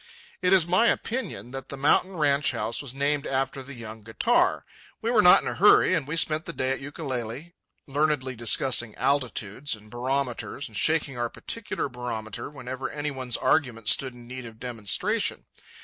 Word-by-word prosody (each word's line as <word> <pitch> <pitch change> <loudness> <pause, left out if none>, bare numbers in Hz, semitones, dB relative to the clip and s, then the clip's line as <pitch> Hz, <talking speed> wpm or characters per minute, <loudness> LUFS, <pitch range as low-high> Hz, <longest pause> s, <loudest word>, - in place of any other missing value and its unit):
It 180 - +2
is 190 -4 +6
my 185 +7 +4
opinion 220 - -2
that 135 0 -7
the 140 - -5
mountain 180 +6 +3
ranch 145 -1 +3
house 110 +2 -2
was 140 -4 -6
named 140 +2 0
after 135 0 -1
the 135 +1 -9
young 110 -1 -8
guitar. 110 +1 +1 0.3
We 230 - -1
were 225 -3 +5
not 180 - +8
in - - -4
a - - -1
hurry, 200 -1 +6
and 155 -6 0
we 150 - -2
spent 160 0 +1
the 170 - -5
day 130 -3 0
at 135 - -2
Ukulele, 135 +1 -5 0.3
learnedly 140 -2 0
discussing 120 0 +1
altitudes 125 -2 -1
and 105 0 -17
barometers 130 +2 -2
and 110 - -15
shaking 150 0 +1
our 120 0 0
particular 230 - -3
barometer 120 -4 -5
whenever 130 -2 -5
any 145 0 -3
one's 130 -3 -3
argument 120 -8 +1
stood 130 -2 0
in 120 -1 -13
need 130 0 -7
of 110 -1 -13
demonstration. 115 -5 -1
135 Hz, 180 wpm, -26 LUFS, 120-150 Hz, 0.3 s, not